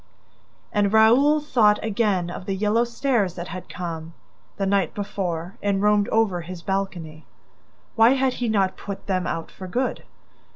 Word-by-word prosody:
And 205 -1 +2
Raoul 245 +8 +5
thought 230 -8 +3
again 200 -5 0
of 180 - -8
the 195 - -1
yellow 215 +4 +2
stars 235 - 0
that 175 0 -6
had 185 +2 -8
come, 165 -2 -6 0.4
the 195 - -1
night 195 0 +1
before, 180 -4 -4
and 200 -1 0
roamed 210 0 +3
over 215 -6 +1
his 170 +1 -9
balcony. 175 -5 -4 0.7
Why 225 +2 +6
had 265 -1 +1
he 245 -2 -2
not 195 -3 +1
put 200 -1 -7
them 185 -2 -1
out 165 - -4
for 185 - -9
good? 250 +8 -2
200 Hz, 160 wpm, -23 LUFS, 180-225 Hz, 0.7 s, Why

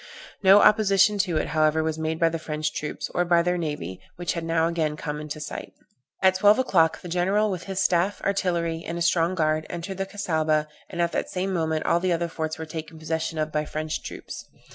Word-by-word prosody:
No 195 +1 +7
opposition 205 -1 +4
to 180 -4 +1
it, - - -1
however, 155 0 +2
was 160 0 -2
made 160 0 -2
by 165 - +4
the 165 0 -4
French 155 -1 -3
troops, 150 - -4
or 175 - +2
by 170 -1 +3
their 180 +1 +1
navy, 145 - -4
which 175 -3 -2
had 170 - -4
now 165 0 +1
again 160 -3 -1
come 150 0 -4
in 150 - -8
sight. 150 0 -6 0.5
At 190 0 +6
twelve 205 +3 +5
o'clock 175 -11 +2
the - - -8
general, 190 +5 +1
with 180 -2 -5
his 190 -1 -3
staff, 180 +3 +1
artillery, 170 -4 0
and 170 - -4
a 170 - 0
strong 170 +1 +2
guard, 155 -2 0
entered 185 +2 -5
the 195 - -1
Cassaubah, 160 -6 0 0.2
and 175 -2 -1
at 170 - 0
the - - -1
same 190 +1 -2
moment 160 -2 -1
all 170 - +3
the 180 0 +1
other 170 0 -1
forts 160 -1 -4
were 160 - -5
taken 160 0 -7
possession 160 0 -3
of 155 0 -1
by 150 0 0
French 155 +1 -4
troops. - - -8
165 Hz, 220 wpm, -25 LUFS, 155-185 Hz, 0.5 s, No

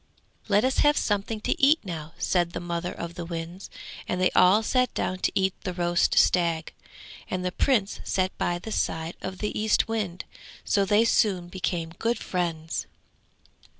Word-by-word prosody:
'Let 205 +2 +3
us 260 - +1
have 295 0 +4
something 210 +1 -1
to - - -1
eat 285 +4 +6
now!' 165 -4 -6
said 175 -2 +1
the - - -3
mother 175 0 -3
of 170 0 -6
the 175 - -6
winds; 170 +2 -6 0.4
and 180 - -1
they 185 - +3
all 195 +5 +5
sat 255 +2 +1
down 185 - -2
to - - +1
eat 190 -1 +2
the 180 -2 -4
roast 175 0 +1
stag, 170 -3 +2 0.6
and 185 0 -2
the 180 - 0
Prince 210 -1 +1
sat 185 0 -1
by 175 - 0
the 220 +5 -8
side 160 -4 -2
of 185 0 -5
the 210 +2 -3
Eastwind, 215 -3 0 0.4
so 200 -1 +2
they 210 +4 +4
soon 190 -6 +2
became 175 -3 -3
good 235 +1 +1
friends. 165 -3 -3
185 Hz, 170 wpm, -26 LUFS, 175-210 Hz, 0.6 s, eat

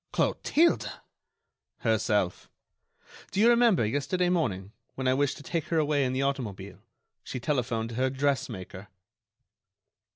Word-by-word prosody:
"Clotilde!" 335 +3 +2 0.9
"Herself. 105 -5 0 0.8
Do - - -3
you 225 - +6
remember, 235 - +4
yesterday 145 - 0
morning, 105 - -1 0.2
when 130 -1 -2
I 130 - +4
wished 140 0 0
to - - -11
take 165 +1 -2
her 165 - -1
away 150 -2 +2
in 125 - 0
the 130 +1 0
automobile, 105 -9 -4 0.4
she 130 - -5
telephoned 120 -4 -1
to 115 - -7
her 130 +1 +2
dressmaker." 125 -8 -2
130 Hz, 130 wpm, -28 LUFS, 110-150 Hz, 0.9 s, you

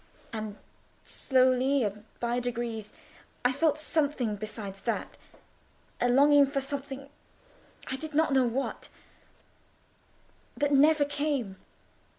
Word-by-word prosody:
And 215 -2 -5 0.5
slowly, 260 +1 +2
and 210 0 -4
by 240 +1 0
degrees, 235 -3 -3 0.5
I 250 - +5
felt 295 +2 +2
something 285 -8 0
besides 205 -2 -6
that: 230 - -3 0.8
a 245 - +2
longing 285 +2 +6
for 275 0 -1
something—I 275 -1 -8
did 310 +1 -7
not 315 -2 +3
know 265 -1 +4
what—that 275 +3 -7
never 295 +1 +5
came. 285 -9 -2
265 Hz, 100 wpm, -29 LUFS, 235-285 Hz, 0.8 s, longing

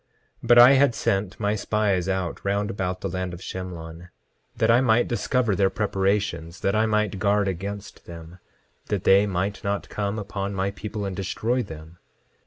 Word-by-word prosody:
10:7 - - -6
But 120 0 +6
I 120 +2 +10
had 135 -3 +4
sent 95 -1 -1
my 105 -1 +1
spies 100 -3 0
out 95 -3 -2
round 100 +2 -1
about 95 -2 -3
the - - -2
land 90 -1 -4
of - - -11
Shemlon, 90 -2 -7 0.5
that - - +3
I 120 +2 +5
might 120 -1 +3
discover 120 -2 0
their 95 +1 +3
preparations, 95 -5 -1
that 100 - +1
I 110 +1 +2
might 105 -2 0
guard 100 +1 +2
against 100 +2 -6
them, 85 +1 -11 0.5
that - - -2
they 100 +2 +5
might 100 +1 -2
not 100 0 -2
come 100 0 -3
upon 100 -1 -4
my 95 +1 -1
people 105 +1 -6
and 95 -1 -4
destroy 115 +6 -1
them. 80 -3 -10
100 Hz, 180 wpm, -24 LUFS, 95-105 Hz, 0.5 s, I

